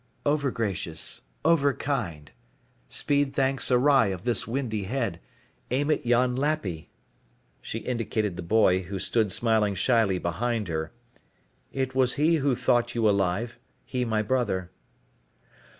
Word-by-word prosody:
"Overgracious. 115 Hz, -, -1 dB, 0.2 s
Overkind. 140 Hz, -, +1 dB, 0.6 s
Speed 145 Hz, -1 st, 0 dB
thanks 135 Hz, 0 st, +1 dB
awry 130 Hz, -1 st, +4 dB
of 95 Hz, -2 st, -4 dB
this 120 Hz, -4 st, 0 dB
windy 115 Hz, -5 st, -2 dB
head, 120 Hz, +3 st, -2 dB, 0.5 s
aim 145 Hz, +5 st, +1 dB
at 145 Hz, -, -1 dB
yon 125 Hz, +1 st, +3 dB
Lappy" 130 Hz, -, -2 dB, 0.7 s
she -, -, -5 dB
indicated 110 Hz, -5 st, -2 dB
the -, -, -5 dB
boy 95 Hz, 0 st, +3 dB
who 95 Hz, +2 st, -6 dB
stood 110 Hz, +2 st, +1 dB
smiling 110 Hz, -2 st, +2 dB
shyly 110 Hz, -2 st, +2 dB
behind 105 Hz, +4 st, -2 dB
her 80 Hz, -1 st, -3 dB, 0.8 s
"it 130 Hz, -1 st, -2 dB
was 130 Hz, -1 st, +2 dB
he 160 Hz, +3 st, +3 dB
who 140 Hz, -3 st, +1 dB
thought 120 Hz, -1 st, +1 dB
you 115 Hz, -2 st, +2 dB
alive, 100 Hz, +4 st, 0 dB, 0.3 s
he 125 Hz, -1 st, -2 dB
my 110 Hz, -2 st, 0 dB
brother." 105 Hz, -7 st, -1 dB
120 Hz, 125 wpm, -26 LUFS, 100-135 Hz, 0.8 s, awry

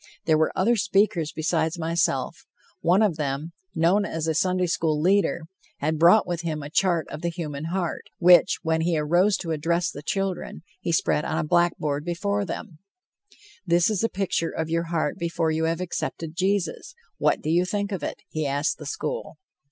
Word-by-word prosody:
There 160 Hz, -2 st, +4 dB
were 155 Hz, -, +2 dB
other 230 Hz, +6 st, +3 dB
speakers 195 Hz, -6 st, +1 dB
besides 160 Hz, +1 st, -1 dB
myself; 160 Hz, -5 st, -1 dB, 0.3 s
one 180 Hz, +6 st, +3 dB
of 185 Hz, -7 st, +1 dB
them, 145 Hz, +2 st, -3 dB, 0.2 s
known 175 Hz, +5 st, +3 dB
as 165 Hz, -5 st, -3 dB
a 160 Hz, -, +1 dB
Sunday 185 Hz, +3 st, +1 dB
school 160 Hz, -3 st, 0 dB
leader, 185 Hz, +1 st, +2 dB, 0.4 s
had 155 Hz, +2 st, -1 dB
brought 175 Hz, +6 st, +6 dB
with 175 Hz, -1 st, -3 dB
him 155 Hz, -3 st, -3 dB
a 145 Hz, -, -8 dB
chart 175 Hz, -2 st, +1 dB
of 150 Hz, -, -7 dB
the 170 Hz, -, -1 dB
human 155 Hz, -4 st, -5 dB
heart, 175 Hz, 0 st, -3 dB
which, 175 Hz, 0 st, +6 dB
when 160 Hz, -1 st, +1 dB
he 165 Hz, 0 st, +1 dB
arose 175 Hz, +7 st, +3 dB
to 165 Hz, -, -5 dB
address 170 Hz, +3 st, 0 dB
the 145 Hz, -, -8 dB
children, 190 Hz, +1 st, -3 dB, 0.2 s
he 170 Hz, -, -2 dB
spread 155 Hz, -2 st, +1 dB
on -, -, -2 dB
a -, -, 0 dB
blackboard 155 Hz, -4 st, +1 dB
before 200 Hz, +4 st, -1 dB
them: 180 Hz, -4 st, -7 dB, 0.8 s
"This 175 Hz, +2 st, +3 dB
is 210 Hz, -2 st, -1 dB
a 230 Hz, -, +2 dB
picture 185 Hz, -4 st, -1 dB
of 160 Hz, 0 st, -4 dB
your 165 Hz, +1 st, 0 dB
heart 165 Hz, -1 st, -1 dB
before 170 Hz, -1 st, 0 dB
you 160 Hz, +1 st, 0 dB
have 165 Hz, +2 st, -1 dB
accepted 165 Hz, -2 st, -4 dB
Jesus. 195 Hz, +2 st, -1 dB, 0.2 s
What 150 Hz, 0 st, +2 dB
do 155 Hz, -, 0 dB
you 175 Hz, +2 st, +3 dB
think 200 Hz, +2 st, -2 dB
of 195 Hz, -, -3 dB
it?" -, -, -5 dB
he 155 Hz, -2 st, -2 dB
asked 140 Hz, +3 st, -1 dB
the -, -, -7 dB
school. -, -, -4 dB
170 Hz, 190 wpm, -25 LUFS, 160-185 Hz, 0.8 s, brought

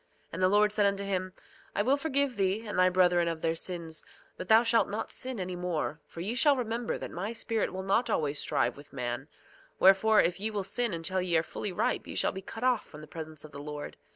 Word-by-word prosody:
And 175 Hz, -, -4 dB
the 185 Hz, -, +5 dB
Lord 210 Hz, +1 st, +4 dB
said 205 Hz, -1 st, +3 dB
unto 200 Hz, 0 st, -1 dB
him: 185 Hz, -2 st, -2 dB, 0.4 s
I 205 Hz, -, +2 dB
will 260 Hz, +5 st, +4 dB
forgive 280 Hz, -3 st, 0 dB
thee 200 Hz, +3 st, 0 dB
and 205 Hz, -3 st, -2 dB
thy 185 Hz, 0 st, +6 dB
brethren 180 Hz, -1 st, +3 dB
of 165 Hz, -1 st, -3 dB
their 165 Hz, -1 st, +2 dB
sins; 165 Hz, -2 st, -4 dB, 0.3 s
but 185 Hz, -, -7 dB
thou 225 Hz, +2 st, +7 dB
shalt 230 Hz, -3 st, +3 dB
not 210 Hz, +2 st, -4 dB
sin 255 Hz, -3 st, -2 dB
any 180 Hz, -1 st, -3 dB
more, 175 Hz, -3 st, -2 dB
for 165 Hz, -, -8 dB
ye 205 Hz, +6 st, -2 dB
shall 285 Hz, +3 st, +4 dB
remember 235 Hz, -2 st, -2 dB
that -, -, -7 dB
my 200 Hz, +6 st, -4 dB
Spirit 225 Hz, -1 st, -1 dB
will 190 Hz, 0 st, -5 dB
not 200 Hz, +6 st, +1 dB
always 145 Hz, -2 st, 0 dB
strive 120 Hz, -2 st, 0 dB
with 145 Hz, 0 st, -14 dB
man; 120 Hz, -2 st, -3 dB, 0.5 s
wherefore, 195 Hz, +3 st, +6 dB
if 175 Hz, +2 st, +2 dB
ye 215 Hz, +2 st, +1 dB
will 205 Hz, -2 st, -2 dB
sin 235 Hz, +4 st, 0 dB
until 175 Hz, +2 st, -1 dB
ye 175 Hz, -2 st, +2 dB
are 160 Hz, -, +2 dB
fully 200 Hz, -, -4 dB
ripe 180 Hz, -, -1 dB
ye -, -, -7 dB
shall -, -, +2 dB
be 190 Hz, -, -7 dB
cut 225 Hz, +4 st, -8 dB
off 255 Hz, -3 st, +3 dB
from 150 Hz, -, -11 dB
the -, -, -9 dB
presence 155 Hz, -1 st, -7 dB
of 155 Hz, -, -12 dB
the 140 Hz, 0 st, -8 dB
Lord. 150 Hz, 0 st, -6 dB
190 Hz, 240 wpm, -30 LUFS, 165-220 Hz, 0.5 s, thou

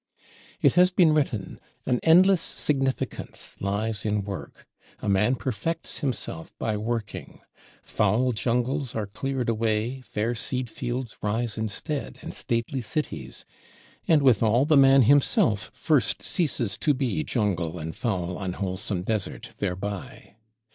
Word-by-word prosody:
It -, -, +6 dB
has 180 Hz, +1 st, +6 dB
been 180 Hz, -4 st, +4 dB
written, 130 Hz, -10 st, -1 dB, 0.3 s
"An 125 Hz, -, +1 dB
endless 180 Hz, +2 st, +6 dB
significance 135 Hz, -5 st, -2 dB
lies 105 Hz, +2 st, -2 dB
in 105 Hz, -1 st, 0 dB
Work;" 100 Hz, -1 st, -8 dB, 0.3 s
a -, -, -5 dB
man 105 Hz, +6 st, +3 dB
perfects 130 Hz, +6 st, -3 dB
himself 125 Hz, -, -4 dB
by 110 Hz, -, -1 dB
working. 110 Hz, -1 st, -4 dB, 0.4 s
Foul 110 Hz, +5 st, +1 dB
jungles 125 Hz, +4 st, -1 dB
are 110 Hz, -2 st, -1 dB
cleared 125 Hz, +5 st, -3 dB
away, 115 Hz, +3 st, 0 dB
fair 115 Hz, 0 st, -2 dB
seed 125 Hz, +1 st, -2 dB
fields 125 Hz, -2 st, -4 dB
rise 110 Hz, +2 st, -1 dB
instead, 110 Hz, +7 st, -3 dB
and -, -, -6 dB
stately 120 Hz, +3 st, -1 dB
cities; 150 Hz, +7 st, -4 dB, 0.6 s
and 155 Hz, -4 st, +4 dB
withal 120 Hz, 0 st, +4 dB
the 155 Hz, 0 st, +4 dB
man 135 Hz, -1 st, +7 dB
himself 115 Hz, -5 st, +3 dB
first 150 Hz, -6 st, +1 dB
ceases 130 Hz, -, 0 dB
to 150 Hz, -2 st, +2 dB
be 135 Hz, +3 st, -1 dB
jungle 90 Hz, -, -1 dB
and 80 Hz, -1 st, -5 dB
foul 90 Hz, -6 st, -2 dB
unwholesome 95 Hz, +1 st, -3 dB
desert 105 Hz, -1 st, -3 dB
thereby. 100 Hz, +1 st, -4 dB
115 Hz, 125 wpm, -26 LUFS, 105-135 Hz, 0.6 s, man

